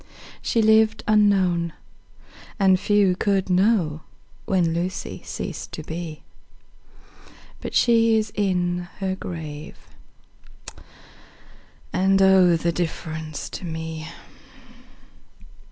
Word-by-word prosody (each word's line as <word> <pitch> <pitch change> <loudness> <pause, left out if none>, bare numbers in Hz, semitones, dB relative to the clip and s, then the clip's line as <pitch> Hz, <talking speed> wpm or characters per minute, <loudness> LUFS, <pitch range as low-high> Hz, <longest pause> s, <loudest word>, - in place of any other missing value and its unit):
She 230 - +1
lived 220 0 +4
unknown, 190 -6 +3 0.8
and 190 -3 +4
few 205 -3 +3
could 195 -1 0
know 180 -5 +2 0.4
When 175 -4 +1
Lucy 175 +2 -4
ceased - - -6
to 155 - -6
be; 160 -1 -7 1.0
10 - - -21 0.3
But - - -6
she 230 -2 +4
is 215 -1 -1
in 180 -3 -1
her 190 -1 -2
grave, 155 -5 -7 2.2
and, 190 +1 +3
oh, 190 -2 +6
The 170 +1 0
difference 160 -2 -4
to - - -8
me! 160 -1 -5
185 Hz, 95 wpm, -23 LUFS, 165-200 Hz, 2.2 s, oh